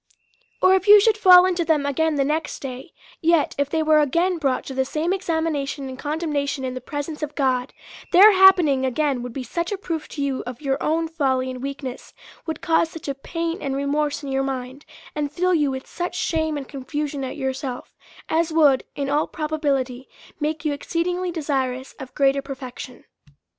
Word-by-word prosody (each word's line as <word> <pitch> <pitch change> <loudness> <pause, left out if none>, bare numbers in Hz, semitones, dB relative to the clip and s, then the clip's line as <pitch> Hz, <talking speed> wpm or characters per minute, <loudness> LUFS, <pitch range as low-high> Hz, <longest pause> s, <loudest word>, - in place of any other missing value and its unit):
Or 370 - +7
if 380 +1 +1
you 415 0 +10
should 435 +1 +4
fall 365 -4 +8
into 360 -2 +1
them 310 -3 +1
again 310 +3 +1
the 275 -1 +1
next 305 +2 -2
day; 260 -1 -7 0.3
yet 330 -2 +3
if 285 -1 +1
they 320 +1 0
were 310 0 +4
again 335 +5 +1
brought 270 -4 0
to 270 - -6
the 265 0 +1
same 310 +6 -1
examination 320 -6 -2
and 260 0 -8
condemnation 295 -3 -2
in 255 - -3
the 255 - -6
presence 290 +4 -5
of 300 -1 -4
God, 260 -2 0 0.4
their 400 +5 +9
happening 365 -8 +5
again 265 0 0
would 245 0 -6
be 260 +2 -5
such 340 - -3
a 405 - -1
proof 330 -5 -4
to 285 - -4
you 275 -2 -1
of 250 -1 -6
your 270 -2 -2
own 325 +1 0
folly 265 -5 0
and 255 -1 -8
weakness, 275 -2 -6 0.3
would 320 - -4
cause 325 0 +2
such 325 -2 -10
a 280 - -1
pain 330 +5 -4
and 270 -1 -2
remorse 290 +1 -1
in 275 - -5
your 270 0 0
mind^ 265 +1 -5 0.3
and 295 -1 -2
fill 365 +4 +1
you 300 -4 +2
with 265 0 -5
such 350 +1 -5
shame 315 -4 -1
and 275 -2 -6
confusion 285 +1 -4
at 260 - -5
yourself, 265 -2 -4 0.3
as 330 0 +1
would 295 -5 +4
in 280 -1 -2
all 295 +2 +1
pro 305 -1 -4
bability 270 -5 -1 0.3
make 310 +1 -2
you 300 - +1
exceedingly 355 +5 -2
desirous 270 -5 -2
of 260 -1 -10
greater 275 0 +3
perfection. 260 -2 -9
290 Hz, 195 wpm, -23 LUFS, 270-325 Hz, 0.4 s, you